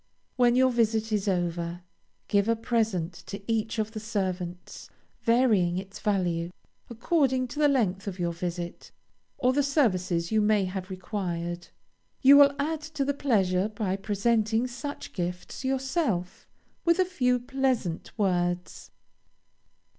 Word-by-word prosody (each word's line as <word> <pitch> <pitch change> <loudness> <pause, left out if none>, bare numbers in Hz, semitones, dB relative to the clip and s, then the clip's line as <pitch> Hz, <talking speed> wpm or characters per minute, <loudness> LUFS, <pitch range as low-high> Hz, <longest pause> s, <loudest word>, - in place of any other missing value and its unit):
When 245 -1 +4
your 260 0 +4
visit 225 -2 +1
is 210 -1 0
over, 175 -1 -1 0.4
give 200 +1 +2
a 230 - +4
present 220 -7 -1
to 200 - -5
each 225 0 -1
of 215 0 -1
the 220 - -5
servants, 185 -5 -4 0.3
varying 220 -8 +3
its 195 +1 -7
value, 175 -5 0 0.4
according 255 +1 +1
to 295 - -6
the 300 - +5
length 210 -9 +1
of 190 -2 -4
your 170 -2 -1
visit 175 0 -5 0.5
or 255 +1 +2
the 285 - +3
services 185 - +1
you 220 -1 +3
may 210 -2 +3
have 185 0 -5
required. 175 -3 -4 0.6
You 275 +2 +9
will 285 0 +7
add 310 +2 -1 0.2
to 275 - +1
the 285 - +1
pleasure 200 -8 +1
by 205 -3 -2
presenting 220 +3 +1
such 285 +4 -6
gifts 180 +5 -5
yourself, 265 - -1 0.4
with 335 -1 +3
a 370 - +3
few 250 -9 +1
pleasant 250 -9 -1
words. 175 -3 -1
215 Hz, 140 wpm, -27 LUFS, 180-250 Hz, 0.6 s, You